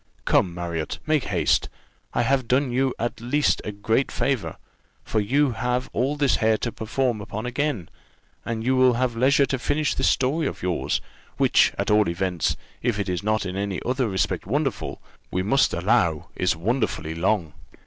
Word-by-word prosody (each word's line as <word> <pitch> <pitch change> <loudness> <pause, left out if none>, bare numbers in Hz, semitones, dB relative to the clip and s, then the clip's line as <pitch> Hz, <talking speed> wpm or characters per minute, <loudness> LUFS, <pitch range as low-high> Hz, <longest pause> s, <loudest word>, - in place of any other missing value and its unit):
"Come, 85 -2 +2
Marriott, 85 -3 -3
make 155 -3 +1
haste. 85 -6 +1 0.5
I 120 - +3
have 130 0 +1
done 130 +1 +2
you 130 +2 +1
at 120 0 -3
least 145 +5 +1
a 105 - -4
great 110 +6 0
favour, 135 -6 -1 0.5
for 110 - -1
you 135 +7 +2
have 125 +2 -2
all 135 +5 0
this 145 -2 +2
hair 110 -1 +3
to 120 - -3
perform 120 0 -1
upon 110 +3 -5
again, 125 - -1 0.6
and 115 -1 -3
you 130 +2 +2
will 130 -1 +5
have 120 0 0
leisure 140 +4 +4
to 135 -1 -2
finish 145 +4 0
this - - +2
story 145 +5 +1
of - - -6
yours 90 -1 0 0.4
which, - - +4
at - - 0
all 105 -3 +4
events, 90 0 -1 0.2
if 120 -3 0
it 100 -2 -2
is 90 -1 -1
not 110 0 0
in 90 0 -4
any 100 -1 -2
other 125 -1 0
respect 95 -1 -1
wonderful, 135 -1 -2 0.3
we 90 - -1
must 135 +8 +3
allow 85 -3 +1
is - - +1
wonderfully 90 -3 -1
long." 85 -1 0
115 Hz, 180 wpm, -24 LUFS, 95-130 Hz, 0.6 s, will